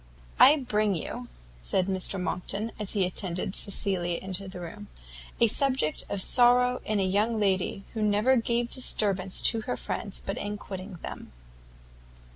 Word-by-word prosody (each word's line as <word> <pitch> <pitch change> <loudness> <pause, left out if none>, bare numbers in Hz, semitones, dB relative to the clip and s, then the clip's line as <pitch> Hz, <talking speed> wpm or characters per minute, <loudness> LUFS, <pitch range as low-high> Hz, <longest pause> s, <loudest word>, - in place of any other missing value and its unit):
"I 285 - +8
bring 215 -7 0
you," 125 -6 -5 0.3
said 180 - 0
Mr 190 0 -1
Monckton, 195 +5 -3
as 210 -2 -3
he 200 -3 +2
attended 185 0 -2
Cecilia 185 -4 0
into 190 +1 -4
the 185 -1 -8
room, 165 -12 -8 0.5
"a 235 - +6
subject 255 - +2
of 200 -2 -2
sorrow 250 0 +4
in 215 -1 0
a - - +2
young 210 +4 +1
lady 195 -1 0
who 220 - -3
never 210 +5 +3
gave 235 0 0
disturbance 195 -7 +2
to 225 -2 +4
her 250 +3 -4
friends 200 -4 -4
but 195 - -3
in 205 0 -4
quitting 190 -1 -8
them." - - -8
200 Hz, 155 wpm, -27 LUFS, 185-230 Hz, 0.5 s, I